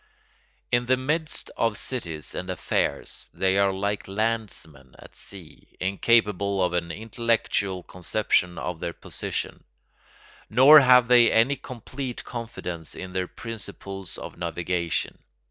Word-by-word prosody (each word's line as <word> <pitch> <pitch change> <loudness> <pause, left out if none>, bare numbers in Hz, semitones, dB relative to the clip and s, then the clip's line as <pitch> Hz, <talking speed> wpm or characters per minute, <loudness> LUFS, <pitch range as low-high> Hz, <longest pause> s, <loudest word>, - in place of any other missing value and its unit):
In 120 0 +2
the 130 +1 +4
midst 150 +4 -1
of 115 -2 +1
cities 85 - -3
and 90 - -5
affairs 90 - -2
they 95 +1 +2
are 100 -1 +4
like 100 +2 -2
landsmen 95 - -3
at - - -15
sea, 90 -6 -12
incapable 100 -1 +2
of 90 -1 0
an 85 -1 -1
intellectual 110 -1 -1
conception 90 -1 0
of 90 -1 -4
their 85 - -3
position: - - -5 0.9
nor 145 +5 +9
have 125 -3 +6
they 120 -2 +6
any 115 +5 +4
complete 130 0 -7
confidence 90 -9 -6
in 95 - -7
their 90 -1 -2
principles 100 -5 -7
of - - -9
navigation. 85 -1 -2
100 Hz, 125 wpm, -25 LUFS, 90-115 Hz, 0.9 s, nor